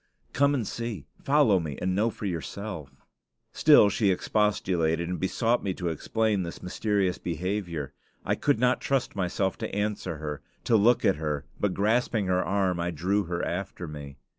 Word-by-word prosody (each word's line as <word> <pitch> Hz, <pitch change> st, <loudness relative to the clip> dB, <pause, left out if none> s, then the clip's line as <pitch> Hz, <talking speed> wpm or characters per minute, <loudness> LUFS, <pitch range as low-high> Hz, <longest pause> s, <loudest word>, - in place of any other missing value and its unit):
"Come 140 Hz, +1 st, +3 dB
and 115 Hz, -7 st, -2 dB
see. 115 Hz, -, -4 dB, 0.2 s
Follow 135 Hz, -9 st, +4 dB
me 75 Hz, -5 st, -5 dB
and 95 Hz, 0 st, 0 dB
know 105 Hz, +5 st, +2 dB
for 110 Hz, -, -7 dB
yourself." 90 Hz, -2 st, -5 dB, 0.6 s
Still 150 Hz, -9 st, +7 dB
she 105 Hz, -1 st, +2 dB
expostulated 90 Hz, -4 st, +1 dB
and 90 Hz, 0 st, -3 dB
besought 115 Hz, +5 st, +1 dB
me 95 Hz, -2 st, -1 dB
to 90 Hz, -2 st, -2 dB
explain 105 Hz, +5 st, 0 dB
this 85 Hz, -2 st, -6 dB
mysterious 95 Hz, 0 st, 0 dB
behavior. 85 Hz, -3 st, -3 dB, 0.3 s
I -, -, +1 dB
could 145 Hz, -5 st, +1 dB
not 125 Hz, +1 st, +2 dB
trust 135 Hz, -2 st, 0 dB
myself 95 Hz, 0 st, -1 dB
to -, -, -4 dB
answer 105 Hz, -5 st, -2 dB
her, 75 Hz, -1 st, -5 dB, 0.2 s
to 115 Hz, -, +3 dB
look 115 Hz, +3 st, +4 dB
at -, -, +3 dB
her; 75 Hz, -2 st, -2 dB
but 105 Hz, -3 st, 0 dB
grasping 110 Hz, +1 st, +1 dB
her 90 Hz, 0 st, +1 dB
arm, 95 Hz, -3 st, 0 dB
I 85 Hz, +1 st, -1 dB
drew 95 Hz, +5 st, 0 dB
her 85 Hz, 0 st, -2 dB
after 90 Hz, 0 st, -4 dB
me. 70 Hz, -3 st, -8 dB
95 Hz, 170 wpm, -27 LUFS, 85-110 Hz, 0.6 s, Still